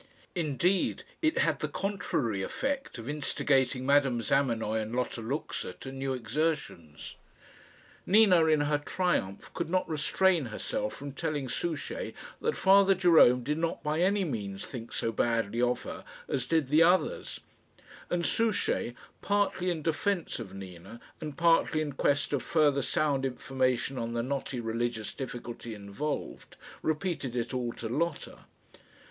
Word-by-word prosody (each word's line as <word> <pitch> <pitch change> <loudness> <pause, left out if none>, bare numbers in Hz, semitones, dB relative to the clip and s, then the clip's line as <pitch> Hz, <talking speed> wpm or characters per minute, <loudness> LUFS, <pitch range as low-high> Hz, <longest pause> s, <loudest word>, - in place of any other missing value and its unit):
Indeed, 175 - +1 0.2
it 315 0 +2
had - - +2
the - - -1
contrary 180 - -1
effect 270 - -3
of 115 0 -8
instigating 135 -3 +1
Madame 140 -3 +3
Zamenoy 115 -4 +1
and 110 +2 -4
Lotta 125 -2 -2
Luxa 135 +7 -3
to 135 - -9
new 135 0 -2
exertions. 115 - -3 0.9
Nina, 190 -5 +6
in 155 -2 +3
her 145 0 +1
triumph, 145 - -1
could - - -3
not 185 +1 +1
restrain 165 +1 +2
herself 265 - -3
from 140 0 -7
telling 145 0 -2
Souchey 160 +2 -3 0.3
that 460 - 0
Father 195 0 +6
Jerome 165 -9 +6
did 150 +4 -1
not 165 0 -2
by 150 +1 0
any 195 +2 +2
means 100 - -4
think 120 -3 -8
so 115 - -1
badly 115 0 0
of 125 0 +1
her - - -7 0.2
as 130 -3 -2
did 160 -5 +1
the 155 +3 +5
others; 185 - +2 0.7
and 175 -1 0
Souchey, 220 - +1 0.3
partly 200 -3 +1
in 165 -4 -2
defence 170 +1 -1
of 105 -5 -7
Nina, 95 +3 -10 0.2
and 150 -3 -6
partly 165 -1 +3
in 150 -2 -2
quest 140 +2 +1
of 140 - +1
further 145 -4 +3
sound 135 0 +1
information 130 0 -1
on 115 0 -3
the 115 0 -1
knotty 135 0 -3
religious 115 -1 -2
difficulty 120 -3 -6
involved, 100 +9 -5 0.3
repeated 155 -5 -2
it 120 +1 -2
all 125 -2 -1
to 115 - -5
Lotta. 155 +6 -3
140 Hz, 145 wpm, -30 LUFS, 120-170 Hz, 0.9 s, Nina